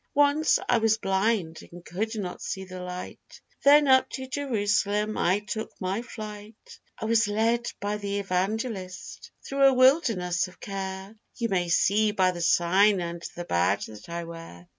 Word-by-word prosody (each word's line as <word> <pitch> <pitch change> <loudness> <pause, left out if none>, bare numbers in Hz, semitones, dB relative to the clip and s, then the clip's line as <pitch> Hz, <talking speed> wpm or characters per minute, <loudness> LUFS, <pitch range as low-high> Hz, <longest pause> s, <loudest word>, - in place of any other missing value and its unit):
Once 290 +2 +4
I 240 - +3
was 220 -1 +2
blind, 195 -4 0
and 175 0 -12
could 220 +5 -3
not 180 -4 -5
see 190 - -4
the 185 0 -8
light, 180 0 -8 0.2
Then 290 +1 +6
up 260 -1 +5
to 260 - -5
Jerusalem 210 -5 0
I 190 +4 +1
took 210 +2 -5
my 190 +4 -2
flight, 215 -2 -10 0.2
I - - -5
was 225 0 +3
led 230 +3 0
by 205 +1 -2
the 200 -1 -3
evangelist 195 0 -3 0.2
through 275 0 +2
a 270 - +6
wilderness 225 - +3
of 185 - -17
care, 195 +1 -6 0.2
You 230 -1 -2
may 180 -3 0
see 210 +5 +3
by 185 -2 +3
the 175 -1 -6
sign 185 +4 +4
and 170 -1 -5
the 175 - -6
badge 90 - +1
that 105 +4 -12
I 170 0 -4
wear. 165 - -10
200 Hz, 165 wpm, -26 LUFS, 180-225 Hz, 0.2 s, Then